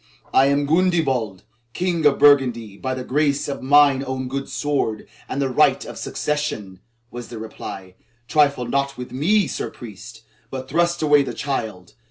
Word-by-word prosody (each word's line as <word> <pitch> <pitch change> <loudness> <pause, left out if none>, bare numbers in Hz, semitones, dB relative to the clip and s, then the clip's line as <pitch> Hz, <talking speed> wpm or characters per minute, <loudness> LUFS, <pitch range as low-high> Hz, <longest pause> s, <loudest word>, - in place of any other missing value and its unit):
"I 135 - +5
am 140 +1 +2
Gundebald, 140 - +1 0.3
King 175 -4 +1
of 140 - +2
Burgundy 125 -7 +4
by 130 +5 -3
the 130 - -5
grace 145 +2 0
of 140 - -4
mine 140 0 +5
own 130 -1 -4
good 135 +1 -4
sword 140 -7 -2 0.2
and 135 - -3
the 140 - +1
right 130 - +2
of - - -8
succession," 110 -11 -3 0.3
was 120 -1 -7
the 120 - -8
reply. 95 -4 -8 0.3
"Trifle 140 -4 +2
not 140 +3 -1
with 125 0 -7
me, 190 +10 +2
Sir 135 - -4
Priest, 110 +1 -11 0.3
but 130 0 -6
thrust 170 +3 +1
away 145 -1 +5
the 135 - -4
child. 110 -10 -4
135 Hz, 165 wpm, -22 LUFS, 120-145 Hz, 0.3 s, I